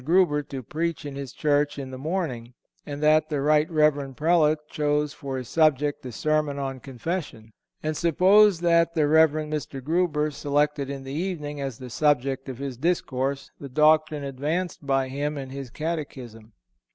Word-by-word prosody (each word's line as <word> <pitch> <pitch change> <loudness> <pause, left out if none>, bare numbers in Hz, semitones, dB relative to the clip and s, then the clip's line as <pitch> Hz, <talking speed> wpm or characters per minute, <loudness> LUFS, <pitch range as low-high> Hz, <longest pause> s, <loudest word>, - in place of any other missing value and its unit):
Grueber 165 -1 +3
to 135 -2 -5
preach 165 +4 -3
in 145 -1 -6
his 140 -2 -6
church 145 -1 +1
in 135 -2 -6
the 130 - -7
morning, 135 -7 -3 0.3
and 145 0 -5
that 155 0 +4
the 150 -3 -1
Rt. 150 +2 +3
Rev. 150 -4 +2
Prelate 155 -1 +2
chose 150 -1 0
for 135 -4 -5
his 125 -2 -6
subject 150 -1 +2
a - - -6
sermon 150 +2 0
on 135 -1 -4
confession; 135 - -5 0.3
and 155 0 -1
suppose 185 +4 +4
that 170 -1 +3
the 155 -2 +3
Rev. 160 +1 +6
Mr. 150 -3 -4
Grueber 155 0 0
selected 145 0 0
in 140 -1 -5
the 135 0 -7
evening, 150 -4 -3
as 135 -4 -4
the 125 -2 -9
subject 135 -1 +1
of 130 - -6
his 135 -2 -5
discourse, 140 -3 -1
the 140 - -8
doctrine 155 +1 +3
advanced 145 +4 -3
by 135 -1 +2
him 145 +3 -3
in 135 -1 -6
his 135 -2 -6
catechism. 130 -8 -6
150 Hz, 170 wpm, -25 LUFS, 135-155 Hz, 0.3 s, Rev